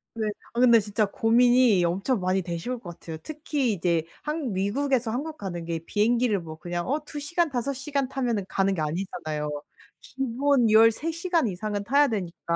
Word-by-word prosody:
네 220 -1 -1 0.3
아 235 - -2
근데 235 -2 +7
진짜 210 +1 0
고민이 235 -1 +4
엄청 195 +7 0
많이 185 0 0
되실 175 +9 -4
것 175 -7 -10
같아요. 160 -1 -7
특히 295 -6 -1
이제 170 -3 0 0.2
한국 300 -6 -3
미국에서 230 +6 0
한국 305 +6 -4
가는 175 -4 -5
게 165 -1 -2
비행기를 215 +4 +1
뭐 160 -2 -9
그냥 175 +1 -4
어 290 +4 +1
2 300 -1 -7
시간 335 +3 0
5 260 +1 -2
시간 275 0 -2
타면은 240 -7 -1
가는 195 0 +1
게 160 - -2
아니잖아요. 155 -2 -3 0.5
기본 265 -1 +1
13 225 +9 +4
시간 335 -5 0
이상은 205 +2 -3
타야 280 +6 +4
되니까. 175 -5 -3
225 Hz, 330 characters per minute, -26 LUFS, 185-270 Hz, 0.5 s, 근데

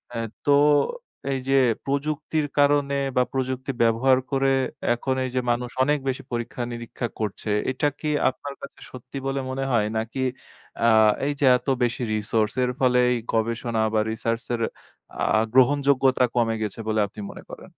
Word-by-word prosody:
আ - - -3 0.3
তো 145 - +5 0.8
এইযে 135 +1 +1 0.3
প্রযুক্তির 150 +2 -1
কারণে 145 -1 +3 0.2
বা 125 - +5
প্রযুক্তি 130 0 -2
ব্যবহার 120 +3 +4
করে 135 0 +2 0.4
এখন 130 +2 -2
এইযে 130 0 -1
মানুষ 120 +1 -2
অনেক 145 +2 +1
বেশি 130 0 -2
পরীক্ষা 120 +1 -4
নিরীক্ষা 120 0 -5
করছে। 105 0 -3 0.2
এটা 145 +3 0
কি 155 - -2 0.2
আপনার 140 +1 -7
কাছে 140 - -10
সত্যি 130 +2 -9
বলে 135 0 -1
মনে 135 +1 -3
হয় 105 -3 +2
নাকি 115 +4 -2 0.6
আ - - +6 0.4
এইযে 145 -1 0
এত - - -18 0.2
বেশি 120 +1 -1
resource 110 0 0
এর 125 - +1
ফলে 125 -1 +3
এই 125 - +1 0.2
গবেষণা 115 0 0
বা 110 - +3
research 115 +1 -2
এর 115 - -2 0.8
আ - - +4
গ্রহণযোগ্যতা 135 0 +4
কমে 115 -2 +2
গেছে 105 +1 -4
বলে 110 0 +1
আপনি 105 +1 -10
মনে - - -11
করেন? - - -10
130 Hz, 155 wpm, -24 LUFS, 115-135 Hz, 0.8 s, আ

